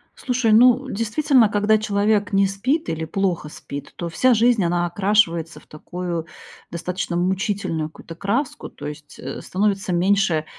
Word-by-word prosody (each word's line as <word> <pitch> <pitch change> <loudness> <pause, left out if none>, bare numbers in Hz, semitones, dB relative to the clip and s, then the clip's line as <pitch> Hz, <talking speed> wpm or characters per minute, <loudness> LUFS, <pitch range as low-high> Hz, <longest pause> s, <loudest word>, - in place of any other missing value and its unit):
Слушай, 250 -3 0
ну, 250 +4 +5
действительно. 230 +2 +2
Когда 210 +1 +2
человек 205 -1 +1
не 195 0 +4
спит 255 - -1
или 160 0 -2
плохо 180 -4 -1
спит, 140 -1 -9
то 170 - -4
вся 250 +9 +3
жизнь 230 -2 +3
она 175 0 +1
окрашивается 175 -3 +1
в - - -20
такую 170 +1 -5 0.4
достаточно 170 0 -3
мучительную 185 -3 -1
какую-то 165 +1 -12
краску. 225 - -2
То - - -10
есть, 150 0 -9
э, 135 +2 -6
становится 195 -1 -1
меньше 180 -3 +2
195 Hz, 145 wpm, -22 LUFS, 170-215 Hz, 0.4 s, ну